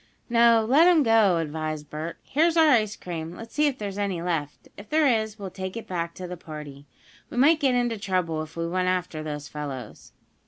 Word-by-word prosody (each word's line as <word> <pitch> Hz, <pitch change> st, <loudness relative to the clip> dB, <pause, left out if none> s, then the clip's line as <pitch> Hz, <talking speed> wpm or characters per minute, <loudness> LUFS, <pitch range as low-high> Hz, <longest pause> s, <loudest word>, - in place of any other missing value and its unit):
"No, 230 Hz, -1 st, +5 dB
let 295 Hz, +8 st, +6 dB
'em 340 Hz, -4 st, +5 dB
go," 220 Hz, -6 st, +4 dB
advised 155 Hz, -1 st, -4 dB
Bert. 155 Hz, +2 st, -5 dB
"Here's 325 Hz, +4 st, +1 dB
our 320 Hz, -2 st, +6 dB
ice 215 Hz, -5 st, +2 dB
cream. 165 Hz, -1 st, -6 dB
Let's 225 Hz, +3 st, -10 dB
see 300 Hz, +1 st, +3 dB
if 275 Hz, -3 st, -2 dB
there's 205 Hz, -1 st, -5 dB
any 195 Hz, -4 st, -1 dB
left. 165 Hz, -4 st, -3 dB
If 205 Hz, +1 st, -12 dB
there 310 Hz, 0 st, +3 dB
is 220 Hz, -4 st, +1 dB
we'll 195 Hz, -3 st, -7 dB
take 190 Hz, +3 st, -6 dB
it 230 Hz, -, -6 dB
back 170 Hz, -2 st, -4 dB
to 185 Hz, -, -7 dB
the 180 Hz, -, -6 dB
party. 150 Hz, -3 st, -10 dB, 0.4 s
We -, -, -8 dB
might 305 Hz, +5 st, +5 dB
get 265 Hz, -4 st, +2 dB
into 240 Hz, -3 st, 0 dB
trouble 180 Hz, -6 st, -1 dB
if 155 Hz, +1 st, -9 dB
we 165 Hz, 0 st, -1 dB
went 185 Hz, +1 st, -1 dB
after 180 Hz, -3 st, -1 dB
those 150 Hz, -1 st, -5 dB
fellows." 140 Hz, -7 st, -7 dB
185 Hz, 210 wpm, -25 LUFS, 160-230 Hz, 0.4 s, let